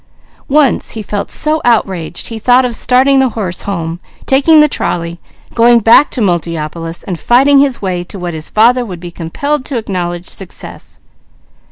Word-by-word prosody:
Once 285 -2 +2
he 215 - -5
felt 205 0 -4
so 310 0 +1
outraged 190 -8 -1
he 225 -1 -6
thought 250 +3 +3
of 240 -2 -3
starting 260 +3 +3
the 265 -1 +2
horse 180 -5 -3
home, 170 -4 -4 0.3
taking 285 +4 +4
the 300 - +6
trolley, 170 - -2 0.3
going 235 +1 +5
back 230 +6 +5
to 250 - -2
Multiopolis 165 -2 -3
and 180 -4 -5
fighting 275 +4 +4
his 275 -6 0
way 180 -2 -2
to 195 - -7
what 175 -2 -5
his 155 -1 -6
father 245 +3 +3
would 185 -7 -8
be 175 0 -8
compelled 255 - -3
to 270 - -3
acknowledge 180 -5 -4
success. 190 -3 -9
215 Hz, 170 wpm, -13 LUFS, 175-255 Hz, 0.3 s, the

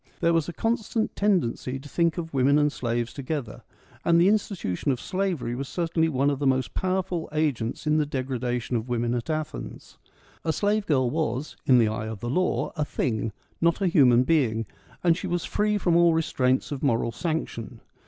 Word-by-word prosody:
There 170 -1 +3
was 165 -1 +1
a - - -6
constant 225 0 -1
tendency 165 - 0
to 135 +2 -11
think 170 +2 +1
of 165 -2 -5
women 135 +2 +4
and 150 0 +3
slaves 120 -2 -2
together; 140 -4 -4 0.4
and 170 0 +4
the 180 +3 +5
institution 195 - 0
of 125 - -2
slavery 185 -10 -2
was 135 +2 -4
certainly 165 -2 0
one 140 0 +2
of 140 - -3
the 145 - +1
most 130 -1 +1
powerful 185 -2 -1
agents 145 -5 -1
in 155 0 +3
the 150 - +2
degradation 125 -3 -2
of 115 +2 -2
women 120 0 0
at 120 +5 -3
Athens. 155 - -5 0.4
A 160 - +1
slave 205 +4 0
girl 130 -5 +2
was, 150 -3 -2
in 130 - +7
the 115 -2 +4
eye 110 0 -3
of 110 -2 -6
the 120 +4 -3
law, 185 +6 0
a 155 - 0
thing 115 -6 -2
— - - -39
not 170 0 +3
a 195 - 0
human 130 -8 +5
being, 125 -7 +1 0.4
and 170 -2 +4
she 190 - -5
was 175 -1 -1
free 210 0 +1
from 175 -4 +1
all 170 -1 +5
restraints 130 -5 +1
of 140 -2 -4
moral 115 -4 +1
sanction. 125 -5 -4
145 Hz, 195 wpm, -26 LUFS, 125-170 Hz, 0.4 s, in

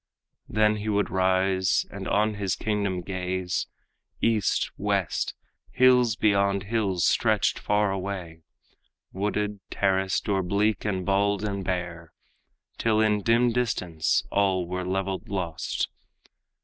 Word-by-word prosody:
Then 105 0 +2
he 105 +1 -4
would 105 -1 0
rise 95 0 +2
and - - -6
on 105 +1 +2
his 100 -3 -1
kingdom 100 -4 -1
gaze. 90 -1 -2 0.5
East, 110 -6 +1
west, - - -1 0.3
hills 125 -3 +4
beyond 100 -2 +2
hills 100 -5 0
stretched - - +2
far 105 -1 +1
away, 95 -4 -5 0.7
Wooded, 105 +1 -2
terraced, 95 -1 0
or 100 -2 +1
bleak 100 +3 0
and 95 -3 -1
bald 100 +1 +1
and 100 -2 -2
bare, 85 -2 -4 0.7
Till 110 -1 +2
in 105 -1 +2
dim 120 +3 +3
distance 90 -10 0
all 95 -3 +2
were 90 +1 -3
leveled 95 +1 -3
lost. 90 -5 -2
100 Hz, 120 wpm, -26 LUFS, 95-105 Hz, 0.7 s, hills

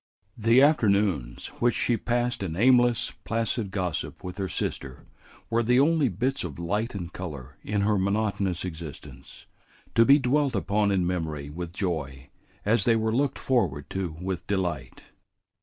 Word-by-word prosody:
The 115 +4 +5
afternoons 100 - +2
which 120 -1 +2
she 120 - +2
passed 120 0 -1
in 85 -5 -3
aimless, 120 +2 +3
placid 115 -1 -1
gossip 90 -5 -3
with 90 +2 -7
her 95 -1 -2
sister 70 -2 -4 0.4
were 115 +1 +1
the 125 +2 +3
only 150 -1 +3
bits 125 +8 -1
of 80 -6 -6
light 105 +7 -2
and 90 -3 -6
color 70 -7 -7
in 105 0 -1
her 105 0 +2
monotonous 100 -2 0
existence, 80 -4 -9 0.5
to 115 - +6
be 140 +4 +7
dwelt 140 0 +1
upon 100 +1 +1
in 95 -3 +1
memory 80 -5 -3
with 85 +2 -6
joy 70 -8 -4 0.3
as 115 +4 +3
they 115 -2 +4
were 110 0 0
looked 140 +1 +1
forward 90 - 0
to 90 -5 -3
with 90 -1 -4
delight. 85 -10 -3
100 Hz, 155 wpm, -26 LUFS, 85-120 Hz, 0.5 s, be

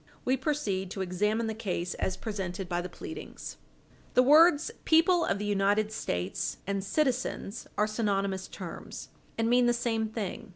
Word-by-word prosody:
We 255 - +3
proceed 245 - -1
to 195 - -4
examine 210 +5 0
the 220 - -2
case 180 -5 -3
as 185 0 -2
presented 195 -4 -4
by 175 0 -1
the 180 - -6
pleadings. 320 - -8 0.6
The 250 - +7
words 310 - +6
"people 335 +2 +5
of - - 0
the 210 - -3
United 205 +1 +2
States" 90 - -2
and 200 0 -1
"citizens" 250 -2 -1
are 210 - +4
synonymous 200 -3 -1
terms, - - -8 0.3
and 225 0 +1
mean 245 +1 +4
the 240 - +4
same 230 -2 0
thing. 215 -1 -5
215 Hz, 160 wpm, -29 LUFS, 195-245 Hz, 0.6 s, The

